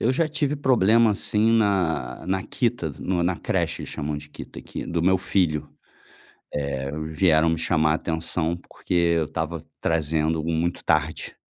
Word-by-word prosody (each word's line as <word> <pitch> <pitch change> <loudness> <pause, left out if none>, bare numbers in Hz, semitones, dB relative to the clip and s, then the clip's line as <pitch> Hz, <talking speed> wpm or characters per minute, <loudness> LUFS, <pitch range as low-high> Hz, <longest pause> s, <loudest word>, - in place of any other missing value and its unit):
Eu 120 - +2
já 160 +5 +1
tive 150 -1 0
problema, 115 -4 +4
assim, 105 +2 +2
na 85 - +1
na 95 0 0
Kita, 120 - -1
no 90 -2 0
na 90 0 0
creche, - - -1
eles - - -7
chamam 75 0 -3
de 75 0 -9
Kita, - - -10
que - - -7
do 85 -1 -1
meu 95 +2 +4
filho, 85 -5 0 0.8
eh, 70 -2 -3
vieram 80 0 +3
me 80 - 0
chamar 80 -1 +2
a - - +3
atenção, 80 +1 -1
porque 90 - -8 0.3
eu 80 - 0
estava 80 +1 -4 0.2
trazendo 80 0 0
muito 85 +2 -1
tarde. - - 0
85 Hz, 160 wpm, -24 LUFS, 80-100 Hz, 0.8 s, problema